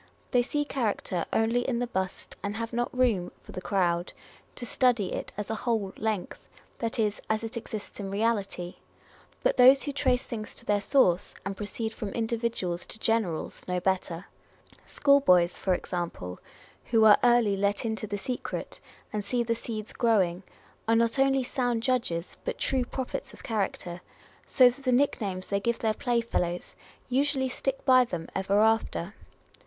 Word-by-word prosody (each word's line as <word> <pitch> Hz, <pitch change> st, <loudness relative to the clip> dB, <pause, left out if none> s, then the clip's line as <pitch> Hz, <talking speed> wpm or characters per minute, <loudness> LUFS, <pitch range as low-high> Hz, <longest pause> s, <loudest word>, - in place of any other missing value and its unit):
They 245 Hz, -, +4 dB
see 295 Hz, +4 st, -1 dB
character 215 Hz, -, -1 dB
only 225 Hz, +2 st, +2 dB
in 245 Hz, -1 st, -1 dB
the 245 Hz, -, 0 dB
bust, 190 Hz, -5 st, -4 dB
and 205 Hz, +1 st, -3 dB
have 230 Hz, +1 st, -4 dB
not 240 Hz, +1 st, 0 dB
room 235 Hz, -8 st, +1 dB
(for -, -, -12 dB
the 185 Hz, -, -6 dB
crowd) 175 Hz, -3 st, 0 dB, 0.4 s
to 240 Hz, -, -5 dB
study 240 Hz, -4 st, +2 dB
it -, -, -4 dB
as 210 Hz, +1 st, -3 dB
a 220 Hz, -, -3 dB
whole 220 Hz, -6 st, 0 dB
length, 215 Hz, -4 st, -2 dB, 0.4 s
that 230 Hz, -1 st, -2 dB
is, 210 Hz, -2 st, 0 dB
as 220 Hz, +1 st, 0 dB
it 225 Hz, +2 st, -4 dB
exists 215 Hz, -3 st, -6 dB
in 195 Hz, -1 st, -4 dB
reality. 200 Hz, -4 st, -1 dB, 0.7 s
But -, -, +2 dB
those 260 Hz, +2 st, +8 dB
who 290 Hz, -, -2 dB
trace 260 Hz, -2 st, +1 dB
things 215 Hz, -5 st, -6 dB
to -, -, -10 dB
their 205 Hz, -1 st, +2 dB
source, 190 Hz, -8 st, +2 dB
and 195 Hz, 0 st, -3 dB
proceed 220 Hz, +2 st, -4 dB
from 210 Hz, -, -5 dB
individuals 225 Hz, -6 st, -2 dB
to -, -, -6 dB
generals, 220 Hz, -7 st, 0 dB
know 180 Hz, 0 st, 0 dB
better. 185 Hz, -1 st, -1 dB, 0.6 s
School 280 Hz, -1 st, +4 dB
boys, 180 Hz, -9 st, +4 dB
for 185 Hz, -2 st, 0 dB
example, 170 Hz, -, -4 dB, 0.5 s
who 225 Hz, -2 st, +4 dB
are 210 Hz, -1 st, +8 dB
early 240 Hz, -4 st, +4 dB
let 200 Hz, +3 st, 0 dB
into 220 Hz, -1 st, -2 dB
the 205 Hz, 0 st, -3 dB
secret, 250 Hz, +5 st, -4 dB, 0.3 s
and 210 Hz, -1 st, -1 dB
see 240 Hz, +4 st, 0 dB
the 230 Hz, 0 st, 0 dB
seeds 220 Hz, -2 st, -6 dB
growing, 195 Hz, -7 st, +2 dB, 0.5 s
are 225 Hz, -, +4 dB
not 230 Hz, +3 st, +2 dB
only 270 Hz, -1 st, +3 dB
sound 245 Hz, -3 st, -1 dB
judges, 235 Hz, -10 st, -1 dB
but -, -, -3 dB
true 260 Hz, -2 st, +1 dB
prophets 260 Hz, +1 st, -5 dB
of -, -, -14 dB
character; 190 Hz, -5 st, -2 dB, 0.5 s
so 255 Hz, -2 st, +6 dB
that 250 Hz, +3 st, -1 dB
the 255 Hz, -, +2 dB
nick 265 Hz, 0 st, +2 dB
names 185 Hz, -3 st, -3 dB
they 200 Hz, -, +1 dB
give 235 Hz, +3 st, 0 dB
their 220 Hz, -1 st, +1 dB
playfellows 230 Hz, -7 st, -1 dB, 0.3 s
usually 270 Hz, +1 st, +1 dB
stick 270 Hz, +1 st, -3 dB
by 255 Hz, -1 st, +7 dB
them 175 Hz, -9 st, -5 dB
ever 195 Hz, +2 st, +2 dB
after. 220 Hz, -4 st, +1 dB
225 Hz, 170 wpm, -28 LUFS, 195-245 Hz, 0.7 s, those